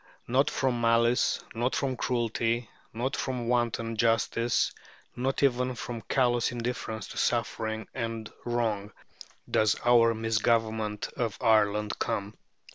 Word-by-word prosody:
Not 130 +4 +3
from 130 -3 0
malice, 115 +1 +3
not 120 +3 0
from 135 -2 0
cruelty, 115 -1 -1 0.2
not 125 +4 -2
from 125 -3 -3
wanton 120 -1 0
injustice, 115 +1 +1 0.4
not 130 +3 -1
even 125 -1 +2
from 120 -1 -5
callous 120 -2 +1
indifference 115 -3 -4
to - - -5
suffering 110 0 -1
and 115 -1 -4
wrong, 110 -4 -1 0.5
does 110 -1 +3
our 115 -1 +5
misgovernment 110 -1 0
of 115 -4 -2
Ireland 105 -1 +2
come. 100 +1 -2
115 Hz, 120 wpm, -28 LUFS, 110-120 Hz, 0.5 s, our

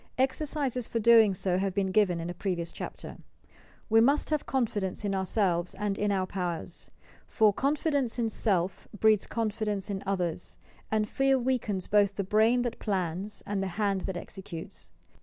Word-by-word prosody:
Exercises 265 -2 -1
for - - -3
doing 225 -3 +6
so 180 0 0
have 195 -1 -1
been 195 -2 0
given 185 -4 +3
in 165 - -4
a 175 - -4
pre 185 +1 -2
vious 170 -1 -5
chapter. - - -7 0.7
We 225 0 +5
must 280 +6 +2
have 305 -2 0
confidence 210 -6 -1
in 200 - 0
ourselves 190 -2 0
and 200 0 -2
in 205 0 +1
our 195 -1 +1
own - - -1
powers; 180 -3 -5 0.4
for 215 -3 +3
"Confidence 280 -1 0
in 230 -2 0
self 190 -4 0
breeds 215 -2 +4
confidence 210 -3 -2
in 195 -1 -3
others, 180 -3 -3 0.3
and 215 -1 +1
fear 270 +3 +2
weakens 235 -7 -1
both 205 -1 +3
the 200 - -1
brain 220 +5 +3
that 240 - -4
plans 190 0 -3
and 200 -1 -2
the 195 - -1
hand 200 -3 +1
that 190 -2 -3
executes." 175 -3 -9
205 Hz, 175 wpm, -29 LUFS, 190-230 Hz, 0.7 s, doing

